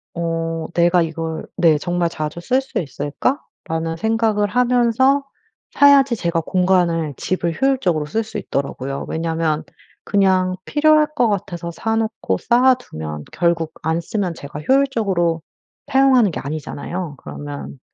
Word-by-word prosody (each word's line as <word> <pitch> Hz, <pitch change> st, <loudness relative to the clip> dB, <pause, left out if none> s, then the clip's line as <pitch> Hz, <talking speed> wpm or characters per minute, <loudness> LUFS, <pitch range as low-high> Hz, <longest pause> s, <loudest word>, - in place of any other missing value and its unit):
어 165 Hz, -1 st, -2 dB
'내가 175 Hz, +1 st, +4 dB
이걸' 160 Hz, 0 st, -4 dB
네 165 Hz, -4 st, +4 dB
'정말 175 Hz, 0 st, 0 dB
자주 155 Hz, 0 st, -5 dB
쓸 255 Hz, +10 st, +1 dB
수 270 Hz, -, -4 dB
있을까.'라는 165 Hz, -, -3 dB
생각을 220 Hz, 0 st, +1 dB
하면서 250 Hz, +4 st, +3 dB, 0.5 s
사야지 275 Hz, -3 st, +5 dB
제가 170 Hz, -5 st, -1 dB
공간을 175 Hz, -4 st, +1 dB
집을 170 Hz, -3 st, -2 dB
효율적으로 255 Hz, -, +1 dB
쓸 220 Hz, +10 st, -1 dB
수 220 Hz, -, -7 dB
있더라고요. 140 Hz, 0 st, -3 dB
왜냐하면 160 Hz, -1 st, -1 dB, 0.4 s
그냥 185 Hz, -2 st, +2 dB
필요할 305 Hz, 0 st, +4 dB
것 240 Hz, -6 st, +3 dB
같아서 175 Hz, -4 st, -3 dB
사놓고 225 Hz, -, -1 dB
쌓아 255 Hz, +2 st, +4 dB
두면 80 Hz, -, -7 dB
결국 170 Hz, -3 st, 0 dB
안 160 Hz, +1 st, 0 dB
쓰면 180 Hz, -1 st, -2 dB
제가 145 Hz, +1 st, -8 dB
효율적으로 200 Hz, -, +2 dB, 0.5 s
사용하는 265 Hz, -5 st, +4 dB
게 -, -, -4 dB
아니잖아요. 155 Hz, +3 st, -5 dB
그러면 70 Hz, -, -8 dB
175 Hz, 300 characters per minute, -20 LUFS, 160-225 Hz, 0.5 s, 사야지